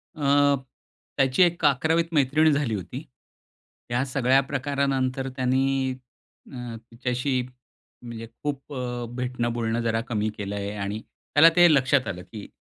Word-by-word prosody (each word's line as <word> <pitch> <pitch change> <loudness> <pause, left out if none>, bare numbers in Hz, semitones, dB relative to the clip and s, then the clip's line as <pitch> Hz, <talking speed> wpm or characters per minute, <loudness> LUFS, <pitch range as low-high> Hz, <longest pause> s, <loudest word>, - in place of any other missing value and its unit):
अ, 145 -1 +3 0.6
त्याची 135 +6 +4
एक 170 -2 +1
11वीत 160 +4 +2
मैत्रीण 150 +2 +4
झाली 140 -6 0
होती. 105 - -6 0.9
या 120 +2 +1
सगळ्या 135 0 +3
प्रकारानंतर 135 -1 -1
त्यानी 130 +1 +1 0.6
अ, 125 -3 -6 0.2
तिच्याशी 125 +2 -1 0.6
म्हणजे 115 -2 -8 0.2
खूप 145 0 -4
अ, 125 -2 -4
भेटणं 125 -2 -2
बोलणं 115 0 -1
जरा 115 -1 0
कमी 110 -1 0
केलं 100 0 -4
आहे 100 0 -3
आणि 100 +1 -4
त्याला 160 +6 +3
ते 175 -3 +7
लक्षात 135 -2 +3
आलं 90 -2 -4
की 105 -3 -10
130 Hz, 135 wpm, -25 LUFS, 120-140 Hz, 0.9 s, ते